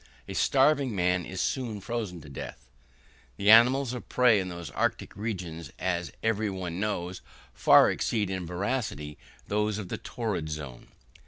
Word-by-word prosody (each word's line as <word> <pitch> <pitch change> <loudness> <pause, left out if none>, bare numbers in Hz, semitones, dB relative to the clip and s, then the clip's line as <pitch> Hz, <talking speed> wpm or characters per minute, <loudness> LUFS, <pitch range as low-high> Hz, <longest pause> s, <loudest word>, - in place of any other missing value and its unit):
A - - -6
starving 135 -3 +3
man 90 -1 +1
is 95 - -4
soon 120 -6 -2
frozen 100 -5 -4
to - - -13
death. 70 - -8 0.7
The 100 +2 +5
animals 125 +3 +6
of 125 - -7
prey 125 -4 +5
in 90 -1 -3
the 85 -2 -7
arctic - - -1
regions, 90 -6 -5
as 90 -2 -2
every 110 -1 +1
one 90 -2 -4
knows, 95 -4 -2 0.3
far - - +6
exceed 105 -4 -1
in 95 -2 -3
voracity 90 - -3 0.3
those 105 0 0
of 100 -4 -6
the - - -4
torrid 105 -10 -3
zone. 75 -5 -7
100 Hz, 155 wpm, -28 LUFS, 90-115 Hz, 0.7 s, animals